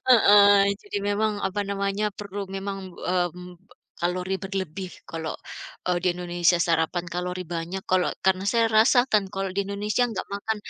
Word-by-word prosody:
Heeh, 205 -4 +7
jadi 205 0 -4
memang 210 +1 +1
apa 200 +2 -2
namanya 200 +1 -1
perlu 205 -1 -6 0.2
memang, 195 0 -4 0.2
mmm, 180 0 -2 0.5
kalori 180 +2 -1
berlebih 190 -1 -4 0.2
kalau, 160 -1 -4 0.5
eee, 180 -1 +2
di 185 - +2
Indonesia 175 0 +2
sarapan 165 +1 +1
kalori 180 +1 -3
banyak 170 +3 -4
kalau 185 -1 +3 0.2
karena 190 0 +2
saya 230 +1 +3
rasakan 220 -1 +4
kalau 195 0 -2
di 200 - +1
Indonesia 205 +4 -1
enggak 225 - -4
makan, 220 +2 -2
195 Hz, 145 wpm, -25 LUFS, 180-205 Hz, 0.5 s, Heeh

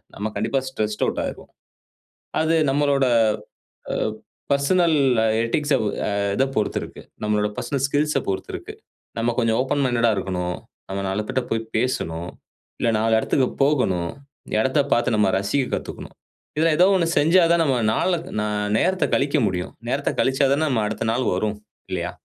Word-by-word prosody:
நம்ம 105 - -3
கண்டிப்பா 125 +5 0
stressed 110 -5 -2
out - - -1
ஆயிருவோம். - - -8 0.9
அது 160 +1 +2
நம்மளோட 140 -1 +2 0.9
அ - - -1 0.6
பெர்சனல் 160 +4 +3 0.5
எட்டிக்ஸ் 145 +5 0 0.3
அ - - 0 0.3
இத 135 - +3
பொறுத்து 105 - 0
இருக்கு. - - -10 0.2
நம்மளோட 105 0 +1
பெர்சனல் 135 +2 -2
ஸ்கில்ஸ் 150 +2 +1
அ - - -6
பொறுத்து 95 - -3
இருக்கு. - - -8 0.5
நம்ம 120 +1 +1
கொஞ்சம் 115 -1 +2
ஓப்பன் 140 +2 0
மைண்டட் 120 -2 +2
ஆ - - +3
இருக்கணும். 90 -2 -2 0.3
நஅங்க 100 0 -3
4 100 +3 -1
பேர்ட 130 -1 0
போய் 115 0 0
பேசணும், 85 -8 -2 0.5
இல்ல 115 - +2
4 110 +1 +2
இடத்துக்கு 130 +2 +1
போகணும், 95 - +1 0.5
இடத்தப் 135 +4 +1
பார்த்து 120 -1 +2
நம்ம 105 - +3
ரசிக்கக் 125 +7 -1
கத்துக்கணும். - - -8 0.4
இத 160 - +3
ஏதோ 180 - +6
ஒண்ணு 175 -3 +2
செஞ்சா 170 +5 +5
தான் 170 0 +4
நம்ம 135 -4 +2 0.2
நாலக் 175 +3 0
ந - - 0 0.3
நேரத்த 185 +8 +2
கழிக்க 140 +2 +1
முடியும். 90 -1 -3 0.2
நேரத்தக் 140 +3 -1
கழிச்சா 135 +1 +2
தான 155 +3 +1
நம்ம 115 -5 +1
அடுத்த 110 +1 -3
நாள் 125 +3 0
வரும் 105 +3 -1 0.4
இல்லையா? - - -2
130 Hz, 160 wpm, -23 LUFS, 105-145 Hz, 0.9 s, ஏதோ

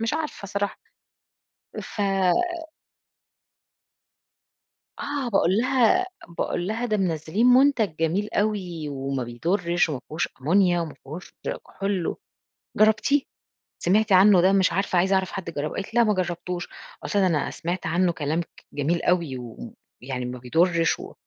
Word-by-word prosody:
مش 225 +4 0
عارفة 305 -10 -4
صراحة 200 0 -2 1.0
ف - - -7 3.0
آه، 285 -3 -3
باقول 195 -3 +2
لها 260 +9 +3 0.3
باقول 175 +1 -1
لها 225 +4 -2
"ده 215 -3 0
منزلّين 180 +4 +1
منتج 250 - +4
جميل 180 +6 0
أوي 185 -7 -1
وما 135 -1 -3
بيضرّش 170 - 0
و - - -2
ما 130 - -4
فيهوش 155 +2 -2
أمونيا 175 +4 +3
وما 165 -3 -4
فيهوش 155 +7 -9 0.3
كحول، 195 -3 -2 0.6
جرّبتيه؟ 220 +7 +3 0.6
سمعتي 205 +3 +2
عنه 190 0 +7
ده 185 +2 +4
مش 195 -2 +3
عارفة 195 -1 +1
عايزة 190 +3 +3
أعرف 190 -1 0
حد 185 -4 -5
جرّبه." 150 -1 -4
قالت 195 - -5
لي: 240 - +4
"لأ - - +6
ما 210 -1 +2
جربتوش" 180 -1 -3 0.3
قُلت - - -3
لها: 195 -2 +4
"أنا 155 -5 0
سمعت 175 +2 -4
عنه 175 +2 +2
كلام 155 +1 -1 0.3
جميل 160 +4 0
أوي 170 -7 +1 0.7
ويعني 125 -1 -4
ما 125 +1 -5
بيضرّش 165 +7 +2
و - - -9
180 Hz, 140 wpm, -25 LUFS, 165-210 Hz, 3.0 s, عنه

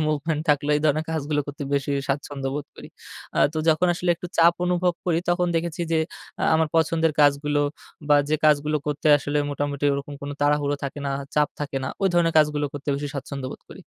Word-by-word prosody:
movement 150 +1 -1
থাকলো 145 0 +1
এই - - -1
ধরনের 155 +1 +2
কাজগুলো 150 -1 -1
করতে 145 0 -6
বেশি 140 0 0 0.2
স্বাচ্ছন্দ্য 135 -1 -2
বোধ 145 -1 -4
করি। - - -10 0.5
আ - - +1
তো 155 - -3
যখন 160 +3 +4
আসলে 175 +1 -1
একটু 180 - -7
চাপ 170 +1 +6
অনুভব 180 0 +1
করি 165 -2 +2
তখন 175 0 +1
দেখেছি 170 +1 -2
যে 160 - +3 0.4
আ - - +1
আমার 160 -1 +2
পছন্দের 160 0 +2
কাজগুলো 145 0 +3 0.5
বা, 145 - +6
যে 155 - +2
কাজগুলো 150 0 +3
করতে 150 +1 -2
আসলে 145 +1 -2
মোটামুটি 145 0 -3
ওরকম 140 +1 -5
কোন 140 - -5
তাড়াহুড়ো 145 0 +2
থাকে 140 +1 -5
না, - - -1 0.2
চাপ 150 -1 +3
থাকে 140 -2 -3
না - - -2
ওই 195 - +4
ধরনের 170 -1 +3
কাজগুলো 150 -1 +2
করতে 145 0 -8
বেশি 145 +1 -3
স্বাচ্ছন্দ্য 140 -1 -5
বোধ - - -9
করি। - - -12
150 Hz, 200 wpm, -24 LUFS, 145-160 Hz, 0.5 s, চাপ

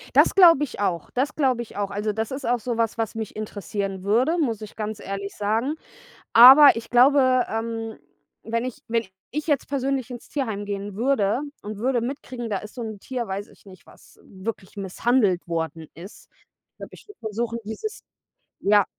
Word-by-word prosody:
Das - - +5
glaube 335 -6 +7
ich 255 -7 -6
auch. 175 -5 -1
Das 265 +3 -1
glaube 260 -5 +1
ich 235 - -10
auch. 200 -1 -1
Also, 210 +1 -1
das 220 +3 -3
ist 265 +1 -5
auch 240 0 +1
so 235 +1 -3
was, 230 0 0
was 225 -1 -2
mich 220 -2 -5
interessieren 200 -2 -4
würde, 250 - +2
muss 230 -9 -1
ich 215 - -9
ganz 215 -1 -4
ehrlich 200 0 -6
sagen. 225 +8 0 0.6
Aber 265 +5 +10
ich 230 0 -6
glaube, 255 0 +5
ähm, 225 0 -4 0.5
wenn 230 +2 -2
ich 255 - -6
wenn 230 0 0 0.3
ich 300 +3 -4
jetzt 290 -4 +1
persönlich 270 -2 -1
ins 240 -1 -9
Tierheim 220 -8 -3
gehen 200 -1 -5
würde 235 -1 +1 0.2
und 210 0 -7
würde 245 +2 0
mitkriegen, 250 -2 -5
da 200 - 0
ist 210 - -11
so 245 - -6
'n 220 -2 -6
Tier, 245 +1 -4
weiß 195 +2 -4
ich - - -22
nicht, 185 -2 -15
was - - -20
w 190 +1 -15
wirklich 205 -4 -5
misshandelt 200 -1 +1
worden 160 -2 -3
ist. 180 +6 -13 0.4
Ich - - -66
glaube, - - -10
ich - - -15
würde 410 - -15
versuchen, 230 +1 -3
dieses 425 - -6 0.6
ja. 205 -1 +4
225 Hz, 195 wpm, -24 LUFS, 205-255 Hz, 0.6 s, Aber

